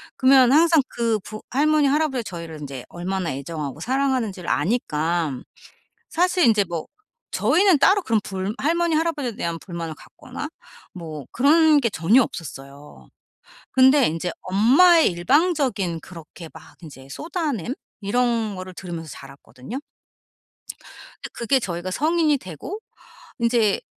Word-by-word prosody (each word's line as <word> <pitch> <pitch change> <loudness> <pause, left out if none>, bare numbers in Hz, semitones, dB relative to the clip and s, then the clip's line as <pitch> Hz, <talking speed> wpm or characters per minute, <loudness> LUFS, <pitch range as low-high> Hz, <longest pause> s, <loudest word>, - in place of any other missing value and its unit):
그러면 260 -1 +5
항상 325 -1 +5
그 230 -2 -1
부 215 +2 -9
할머니, 300 +2 +2
할아버지가 280 -4 0
저희를 160 -2 -8
인제 135 -3 -7
얼마나 180 -1 -3
애정하고 145 +1 -6
사랑하는지를 250 -7 -1
아니까 165 - 0 0.7
사실 360 -2 +2
인제 215 -3 +4
뭐 170 -2 -5 0.4
저희는 380 -4 +3
따로 385 +8 +4
그런 225 -9 +1
불 190 +2 -4
할머니, 335 +3 +1
할아버지에 300 -8 -1
대한 170 -3 -3
불만을 170 -3 -6
갖거나 - - -9 0.4
뭐 155 -5 -8
그런 305 +3 +4
게 235 -4 0
전혀 200 +8 +3
없었어요. 140 -4 -10 0.6
근데 265 +1 +5
인제 165 +2 -3
엄마의 270 - +5
일방적인 255 - +1
그렇게 165 -1 -12
막 - - -15
인제 135 -4 -12
쏟아냄? 290 - -3 0.3
이런 225 0 0
거를 185 0 -8
들으면서 170 -4 -7
자랐거든요. 135 - -10 1.4
그 - - -7
그게 260 +3 +1
저희가 180 -3 -4
성인이 310 - +1
되고 185 - -8 0.6
인제 230 -3 +2
220 Hz, 305 characters per minute, -22 LUFS, 170-285 Hz, 1.4 s, 그러면